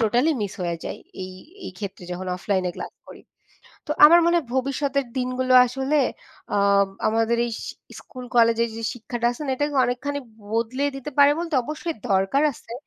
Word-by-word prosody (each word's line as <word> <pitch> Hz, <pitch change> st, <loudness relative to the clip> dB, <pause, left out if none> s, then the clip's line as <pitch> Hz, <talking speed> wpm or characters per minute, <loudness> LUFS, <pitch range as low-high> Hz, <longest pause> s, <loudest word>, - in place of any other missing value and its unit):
Totally 240 Hz, +8 st, +3 dB
miss 200 Hz, -, -3 dB
হয়ে 170 Hz, -1 st, -2 dB
যায় -, -, -5 dB, 0.2 s
এই 185 Hz, -, -7 dB, 0.3 s
এই -, -, -5 dB
ক্ষেত্রে 195 Hz, -3 st, -7 dB
যখন 185 Hz, +1 st, -5 dB
অফলাইনে 185 Hz, -1 st, -1 dB
ক্লাস -, -, -6 dB
করি। -, -, -12 dB, 0.7 s
তো -, -, -7 dB
আমার 340 Hz, +3 st, +9 dB
মনে 340 Hz, 0 st, +3 dB
হয় 315 Hz, -, -5 dB
ভবিষ্যতের 275 Hz, +1 st, 0 dB
দিনগুলো 255 Hz, 0 st, -1 dB
আসলে 270 Hz, +4 st, 0 dB, 0.6 s
অম 200 Hz, 0 st, +4 dB, 0.2 s
আমাদের 225 Hz, +1 st, +1 dB
এইস 230 Hz, -, -5 dB, 0.4 s
স্কুল 255 Hz, -1 st, -10 dB
কলেজের 230 Hz, 0 st, +4 dB
যে 230 Hz, -, -6 dB
শিক্ষাটা 240 Hz, 0 st, -3 dB
আছে 245 Hz, -, -8 dB
না -, -, -1 dB
এটাকে 290 Hz, +1 st, -1 dB
অনেকখানি 275 Hz, +4 st, -2 dB, 0.3 s
বদলিয়ে 255 Hz, +5 st, 0 dB
দিতে 270 Hz, +2 st, -6 dB
পারে 285 Hz, 0 st, +8 dB
বলতে 335 Hz, -3 st, -3 dB
অবশ্যই 310 Hz, +3 st, -4 dB
দরকার 195 Hz, +9 st, +2 dB
আছে। 230 Hz, -, -13 dB
245 Hz, 170 wpm, -23 LUFS, 220-285 Hz, 0.7 s, আমার